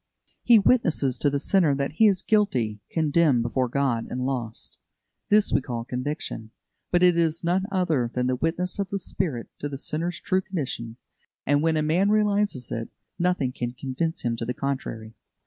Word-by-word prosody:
He 235 -2 +6
witnesses 165 - +2
to 145 - +3
the 140 - 0
sinner 160 -1 +2
that 140 0 -2
he 215 +8 +4
is 195 -2 +2
guilty, 130 - +1
condemned 155 -5 +2
before 125 +2 0
God, 125 -3 0
and 125 0 -3
lost. 120 -4 -4 0.5
This 210 0 +4
we - - +3
call 120 -3 -5
conviction; 125 -3 -4 0.4
but 175 0 +2
it 180 -1 +6
is 165 -1 +1
none 185 +3 +1
other 165 -11 +1
than 125 0 -1
the 130 0 +1
witness 170 +7 -2
of 195 -2 -1
the 200 - -2
Spirit 170 -9 -3
to 145 - -3
the 140 - -5
sinner's 165 +5 -3
true 190 -1 0
condition; 135 - -4 0.5
and 145 0 +3
when 160 0 +2
a 155 - +1
man 175 +6 +2
realises 205 - +1
it, 115 0 -4 0.3
nothing 175 -7 +1
can 120 -1 -4
convince 135 +6 -3
him 120 -1 0
to 115 - -4
the 125 +1 -3
contrary. 115 -5 -4
145 Hz, 180 wpm, -25 LUFS, 125-180 Hz, 0.5 s, He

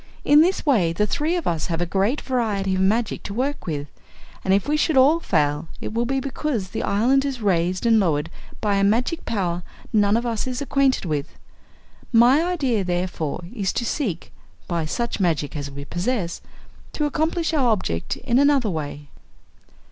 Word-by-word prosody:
In 295 +1 +7
this 360 +3 +1
way 200 - +3
the 210 +5 +1
three 300 - 0
of 345 - -2
us 165 -2 -1
have 165 -1 -2
a 175 - +1
great 200 - 0
variety 215 -7 -1
of 185 - 0
magic 215 +4 +1
to 200 - -7
work 275 +1 -2
with, 145 -3 -2 0.6
and 190 - 0
if 195 +5 +2
we 300 - +2
should 305 -1 +1
all 285 +6 +6
fail 150 - 0
it - - -6
will 235 +1 0
be 270 +1 0
because 265 -7 -3
the - - -3
island 250 +7 +2
is 275 -3 -3
raised 185 -2 0
and 225 -1 +5
lowered 160 -4 0 0.3
by 205 -2 +1
a 195 - +2
magic 240 - +1
power 180 -6 -1 0.3
none 205 0 +4
of 235 - -2
us 230 0 -2
is 255 -1 -3
acquainted 275 -4 +1
with. 150 -3 -3 0.7
My 245 +5 +6
idea 275 - 0
therefore 175 -3 -2
is 200 -6 -1
to 240 - -2
seek 215 - -3 0.4
by 170 -2 -1
such 235 +10 -2
magic 160 -6 0
as 145 -1 -4
we 140 0 -8
possess 175 - -2 0.5
to 300 - -1
accomplish 320 +3 0
our 270 -6 +3
object 135 - -1
in 240 +2 +1
another 280 -6 +3
way." 145 -2 -5
215 Hz, 185 wpm, -23 LUFS, 175-270 Hz, 0.7 s, In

